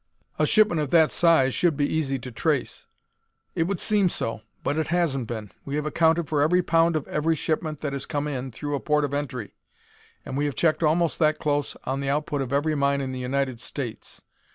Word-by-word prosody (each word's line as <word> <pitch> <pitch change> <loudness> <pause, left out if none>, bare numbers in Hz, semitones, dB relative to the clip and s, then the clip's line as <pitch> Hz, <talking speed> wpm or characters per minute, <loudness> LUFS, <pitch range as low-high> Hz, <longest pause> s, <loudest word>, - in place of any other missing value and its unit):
"A - - +3
shipment 210 -7 +4
of 145 - -2
that 160 -1 +5
size 160 -7 +4
should 170 -5 +1
be 145 - +2
easy 145 -3 -1
to 125 0 -8
trace." 115 - -2 0.7
"It 165 - +1
would 195 -3 -2
seem 205 -4 +2
so, 115 -8 -3 0.2
but 145 +3 0
it 160 - -1
hasn't 155 -8 0
been. 110 -4 -6
We 140 - -4
have 150 0 -1
accounted 160 +1 +2
for 150 -1 +1
every 180 +5 +3
pound 165 0 +3
of 155 - -2
every 160 +2 +1
shipment 155 0 -2
that 145 -2 -3
has 140 0 -4
come 145 0 -2
in 135 -3 -3
through 145 +5 -5
a 140 - 0
port 150 0 +1
of 140 - -5
entry, 135 -6 -4 0.7
and 130 - -5
we 145 +2 0
have 145 - -2
checked 160 -1 +2
almost 165 +1 +2
that 155 -1 +3
close 145 -1 -1
on 135 +1 -2
the 140 0 -2
output 145 0 -1
of 130 -2 -4
every 145 +3 +1
mine 140 -1 +1
in 135 -1 -3
the 130 - -5
United 130 -1 -2
States. 125 -4 -6
145 Hz, 220 wpm, -25 LUFS, 135-160 Hz, 0.7 s, that